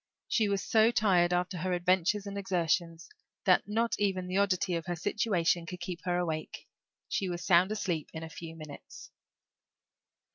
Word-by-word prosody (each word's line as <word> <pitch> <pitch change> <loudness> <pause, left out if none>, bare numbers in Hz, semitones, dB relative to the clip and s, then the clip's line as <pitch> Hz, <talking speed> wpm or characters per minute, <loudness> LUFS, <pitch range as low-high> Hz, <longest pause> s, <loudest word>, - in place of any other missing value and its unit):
She 215 -3 +2
was 200 -1 0
so 220 0 +4
tired, 185 -7 +3
after 180 0 -1
her 185 +2 -1
adventures 185 +3 +1
and 200 0 -6
exertions, 175 -3 -1 0.4
that - - +4
not 230 +3 0
even 190 -3 0
the 180 +1 -2
oddity 195 -2 +1
of 165 0 -3
her 175 - -1
situation 175 -2 0
could 180 +1 -7
keep 175 -1 -6
her 175 -1 +1
awake; 160 -3 -4 0.4
she 190 - -1
was 175 -1 -4
sound 180 +2 +4
asleep 175 -7 -2
in 160 0 -7
a - - -5
few 165 0 -9
minutes. 155 -3 -11
180 Hz, 170 wpm, -30 LUFS, 170-200 Hz, 0.4 s, so